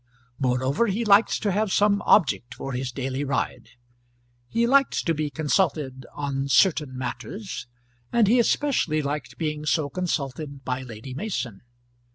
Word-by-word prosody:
Moreover, 130 - +1
he 220 +3 -1
liked 205 +2 +4
to 205 - +2
have 205 +1 0
some 205 0 +3
object 125 - +3
for 135 - -5
his 130 0 -3
daily 130 +1 -3
ride; 140 -4 -2 0.8
he 230 - +1
liked 275 +2 +3
to 165 - +2
be 150 -1 -2
consulted 145 -4 0
"on 140 -1 -2
certain 140 -1 +3
matters;" 190 - -5 0.4
and 235 -2 +4
he 240 +4 +5
especially 235 - +1
liked 140 -3 -4
being 150 -2 -2
so 150 -1 0
consulted 140 -5 -3
by 130 0 -2
Lady 120 0 -8
Mason. 130 - -4
150 Hz, 145 wpm, -25 LUFS, 130-200 Hz, 0.8 s, he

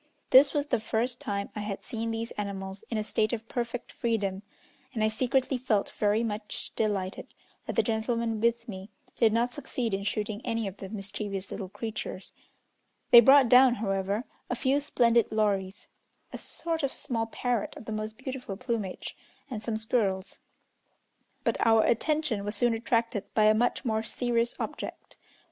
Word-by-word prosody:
This 265 +3 +8
was 290 -1 0
the 290 - 0
first 235 +3 -1
time 200 0 -3
I - - -3
had 205 -1 -4
seen 230 0 -3
these 225 +1 -3
animals 195 -1 -5
in 230 - -1
a 215 - 0
state 215 +1 0
of 225 -1 -4
perfect 240 0 -4
freedom, 200 -5 -1 0.5
and 220 - +1
I 215 - +4
secretly 255 +3 +1
felt 220 -5 +1
very 210 +2 +1
much 210 -1 -4
delighted 200 -4 -1 0.4
that - - -3
the - - +4
gentlemen 225 -1 -1
with 235 +1 +1
me 190 -2 -7 0.3
did 225 -2 +4
not 235 +2 +1
succeed 250 -5 -3
in 195 - 0
shooting 210 +1 -2
any 230 -3 -1
of 195 0 -7
the 195 - -8
mischievous 200 -1 -5
little 195 -3 -5
creatures: 210 -2 -5 0.8
they 240 - +12
brought 270 +2 +7
down, 250 +1 +7
however, 200 0 -1 0.3
a 250 - 0
few 265 +3 +2
splendid 235 -5 +3
lories 200 -2 0 0.5
(a - - -4
sort 330 -1 -3
of 275 -2 0
small 230 -6 -2
parrot 240 -1 -2
of - - -10
the - - -5
most 215 0 -4
beautiful 255 -6 -6
plumage) 230 -6 -3 0.4
and 215 -4 -4
some 220 0 -2
squirrels. 210 -4 -1 1.0
But - - +1
our 225 -1 +5
attention 270 -3 +1
was 205 +2 -2
soon 240 +3 +3
attracted 230 -2 -1
by 215 - +4
a 215 0 +6
much 245 +4 +1
more 220 -2 +1
serious 235 +1 0
object. - - -6
225 Hz, 170 wpm, -29 LUFS, 205-240 Hz, 1.0 s, they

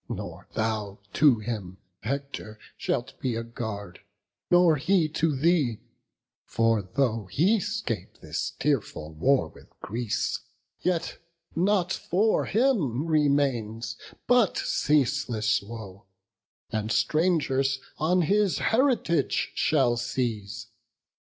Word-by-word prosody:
nor - - -6
thou 110 -2 -2 0.2
to 145 -6 +5
him, 105 -4 -5 0.2
Hector, 135 -3 -4 0.2
shalt 125 - -3
be 125 -3 -1
a 115 - -2
guard, 105 -5 -6 0.5
nor 175 -3 +5
he 175 +3 +2
to 155 -1 0
thee: 140 -6 +2 0.6
For 115 -1 +1
though 115 +2 -1
he 185 - +3
'scape 195 - -4
this - - -4
tearful 105 - -1
war 130 - +2
with - - -17
Greece, 115 +3 -2 0.4
Yet 180 -2 -1 0.4
nought 180 0 +2
for 210 +5 +1
him 195 - +1
remains 135 -8 +1 0.3
but 245 -5 +3
ceaseless 130 -7 +1
woe, 100 -2 -10 0.6
And 110 0 -2
strangers 140 -5 +2 0.2
on 175 +3 +3
his 205 +2 +2
heritage 230 - +1
shall 130 -6 +2
seize. 115 -3 -3
135 Hz, 105 wpm, -27 LUFS, 110-165 Hz, 0.6 s, to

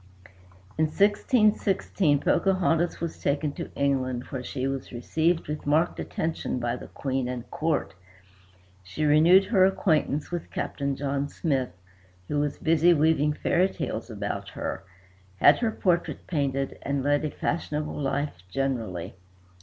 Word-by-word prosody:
In 160 - +4
1616 200 - +2
Pocahontas 175 -2 +1
was 170 -1 -5
taken 145 +1 0
to - - -6
England, 130 -3 0
where 130 -2 -4
she 130 +1 -3
was 135 -1 -4
received 160 +8 0
with 150 -1 -5
marked 160 +4 +2
attention 160 -4 -3
by 120 -1 -1
the - - -9
Queen 135 -2 -2
and 125 -1 -5
court. 155 -8 -1 0.9
She 95 +12 -3
renewed 160 +6 +6
her 190 -4 +4
acquaintance 160 -6 +1
with 175 -2 -4
Captain 140 -1 -2
John 140 +1 -2
Smith, 135 -6 -1 0.6
who 145 - 0
was 145 0 -1
busy 165 +2 +4
weaving 150 -1 +3
fairy 180 +5 +2
tales - - -4
about - - -4
her, - - -5 0.5
had 145 +9 +6
her 230 - +1
portrait 180 -5 -1
painted 135 -4 -2
and 140 -1 -2
led 145 +1 +2
a 155 - -1
fashionable 150 -1 -2
life 140 -8 -2
generally. 115 -8 -2
150 Hz, 140 wpm, -26 LUFS, 135-170 Hz, 0.9 s, renewed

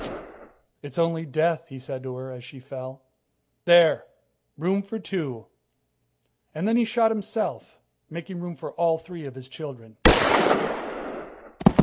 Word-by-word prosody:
"It's 140 -2 -8
only 165 -1 +1
death," 160 +3 +1
he 135 -4 -10
said 130 0 -6
to 130 -1 -6
her 130 +1 -7
as 125 -1 -10
she 130 +2 -11
fell. 130 0 -9 0.6
"There! 170 -2 +6 0.5
Room 185 +6 +1
for 200 +3 -6
two." 150 - -4 1.1
And 165 +6 -1
then 225 - +3
he 235 -1 +4
shot 225 0 +3
himself, 215 0 -3 0.3
making 175 +2 -7
room 175 -1 -6
for - - -7
all 165 -1 +2
three 165 -1 -10
of 130 - -10
his 130 -1 -11
children. 125 -7 -10
160 Hz, 135 wpm, -25 LUFS, 130-175 Hz, 1.1 s, There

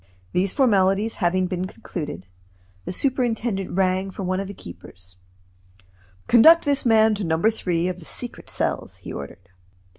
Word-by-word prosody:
These 185 +1 0
formalities 210 -4 +2
having 185 +1 +2
been 185 0 -3
concluded, 150 - -7 0.6
the - - -4
superintendent 235 -4 -1
rang 190 +1 0
for 195 +1 -7
one 185 +1 -1
of 195 - -4
the 200 - -7
keepers. 90 - -13 1.1
"Conduct 320 +9 +7
this 280 -3 +1
man 220 -1 +5
to 205 -1 -3
No. 160 -2 0
3 180 -4 0
of 185 -1 -4
the 165 - -13
secret 245 +7 -4
cells," - - -2
he - - -9
ordered. 90 +6 -9
190 Hz, 150 wpm, -23 LUFS, 175-225 Hz, 1.1 s, Conduct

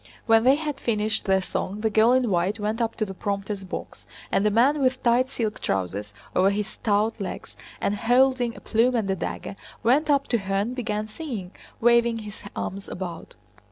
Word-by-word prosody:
When 225 0 +5
they 265 +2 +7
had 295 -2 -4
finished 215 -1 0
their 190 -1 +2
song 200 +3 -3
the 220 0 +1
girl 220 +3 +5
in 255 -4 +2
white 185 +5 +1
went 215 +3 -1
up 230 -1 -1
to 215 - -1
the 195 - -7
prompter's 200 +1 -3
box 190 - -7 0.2
and 195 - +2
a - - +4
man 260 +8 +3
with 255 -1 +1
tight 245 +2 +3
silk 225 -5 -3
trousers 100 +2 -2 0.2
over 190 +1 +5
his 205 +1 -1
stout 215 0 0
legs, 185 - -6 0.2
and 200 - 0
holding 245 +1 +3
a - - -11
plume 235 +3 +2
and 220 -4 0
a - - +1
dagger, 195 - -5 0.3
went 280 +7 +3
up 280 -1 +3
to 235 - +2
her 195 0 -3
and 205 +5 0
began 215 -4 -2
singing, 215 - -6 0.3
waving 235 0 +4
his 210 -2 -8 0.2
arms 195 +1 -4
about. 175 -2 -6
220 Hz, 195 wpm, -25 LUFS, 200-245 Hz, 0.3 s, they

